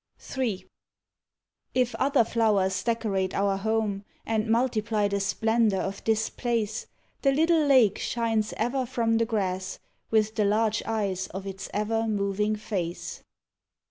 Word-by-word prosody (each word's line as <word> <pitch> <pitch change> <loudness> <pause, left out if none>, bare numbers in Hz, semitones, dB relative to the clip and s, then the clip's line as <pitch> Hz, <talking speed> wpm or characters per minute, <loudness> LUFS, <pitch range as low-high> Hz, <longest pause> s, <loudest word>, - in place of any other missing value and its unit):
III 235 -8 -1 1.1
If 250 -1 +2
other 275 -2 +3
flowers 200 -5 +1
decorate 200 -5 0
our 200 0 +2
home, 215 -1 -1 0.2
And 220 0 0
multiply 225 -3 +1
the 200 0 -1
splendour 220 +1 +2
of 195 +1 -4
this 220 -1 +2
place, 225 -3 -2 0.3
The 275 - +4
little 320 +3 +3
lake 250 -8 +5
shines 225 -2 0
ever 245 +3 0
from 230 -2 +1
the 230 - +3
grass 190 -4 -2 0.3
With 215 -1 +2
the 215 -2 +1
large 215 +1 +2
eyes 200 -4 -1
of 190 +1 -7
its 195 0 -6
ever 225 +2 0
moving 210 0 0
face. 185 -5 -4
220 Hz, 135 wpm, -27 LUFS, 200-230 Hz, 1.1 s, lake